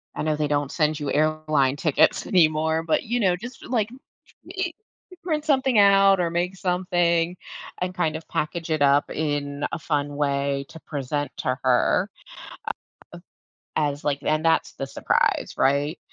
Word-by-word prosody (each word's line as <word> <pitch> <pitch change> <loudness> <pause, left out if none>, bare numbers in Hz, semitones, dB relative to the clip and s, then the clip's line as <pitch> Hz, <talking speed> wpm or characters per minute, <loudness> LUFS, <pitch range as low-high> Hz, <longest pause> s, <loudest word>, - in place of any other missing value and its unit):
I - - -3
know 155 0 +1
they 150 0 -1
don't 145 -1 -1
send 155 -2 0
you 145 -2 -3
airline 155 -3 +1
tickets 150 -1 +2
anymore, 160 -2 +2
but 165 - +1
you 240 +2 -1
know, 185 -5 +3
just 240 +8 -10
like 230 -4 0 0.7
e 370 -3 -2 0.5
print 310 -3 -1
something 265 -5 +2
out 195 -1 +6
or 175 -1 +1
make 175 +2 -1
something 175 -2 +1 0.5
and 180 0 -2
kind 160 -3 0
of 160 - -7
package 165 +2 -3
it 155 -2 0
up 140 0 +4
in 145 -2 -2
a - - -3
fun 145 -2 -2
way 140 -1 -1
to 160 - -11
present 145 -1 -3
to 125 0 -1
her, 125 -2 +2 1.7
a - - +2
uh, 150 - +2
as 140 +1 -10
like 145 -1 0
and 155 +1 +1
that's 165 0 +2
the 135 - -5
surprise, - - 0
right? 145 +4 +1
155 Hz, 165 wpm, -24 LUFS, 145-180 Hz, 1.7 s, out